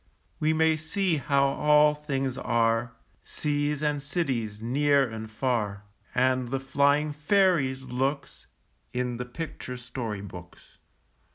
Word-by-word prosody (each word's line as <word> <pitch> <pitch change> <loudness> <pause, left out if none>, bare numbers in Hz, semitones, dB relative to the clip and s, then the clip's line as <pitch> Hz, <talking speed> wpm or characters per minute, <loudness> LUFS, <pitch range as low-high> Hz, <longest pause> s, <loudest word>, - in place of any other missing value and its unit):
We 155 +1 +2
may 160 0 +3
see 165 +2 0
how 140 0 +2
all 150 +2 +4
things 135 -3 -2
are, 115 -2 +1 0.3
Seas 145 0 -2
and 150 -1 0
cities, 130 - -2
near 140 +4 +2
and 110 -1 -7
far, 110 -4 -1 0.3
And 130 0 +2
the 135 +2 -2
flying 140 +2 +2
fairies' 150 -5 +2
looks, 135 +3 -3 0.5
In 125 -1 -2
the 125 - -4
picture 125 -1 -6
story 115 -4 -5
books. 90 -3 -12
135 Hz, 120 wpm, -27 LUFS, 120-150 Hz, 0.5 s, all